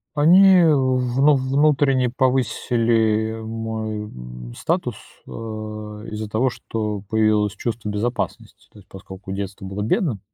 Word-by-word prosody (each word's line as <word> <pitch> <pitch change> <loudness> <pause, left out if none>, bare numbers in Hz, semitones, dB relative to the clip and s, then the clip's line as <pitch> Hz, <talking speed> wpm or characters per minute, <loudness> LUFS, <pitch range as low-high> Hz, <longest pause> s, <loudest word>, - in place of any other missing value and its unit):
Они 180 +4 +6
вну 130 -1 +3
внутренне 135 -1 +2
повысили 115 -3 +1
мой 110 -1 -4
м - - -10
статус, - - -1 0.3
а, 110 -1 -7
из-за 110 0 -4
того, 110 +5 +1
что 105 -4 -4
появилось 110 -2 +2
чувство 110 0 -4
безопасности, 110 +1 -4
то 105 - -16
есть 95 - -20
поскольку 95 0 -10
детство 100 0 -5
было 100 +2 -4
бедным. 125 - 0
110 Hz, 115 wpm, -22 LUFS, 105-130 Hz, 0.3 s, Они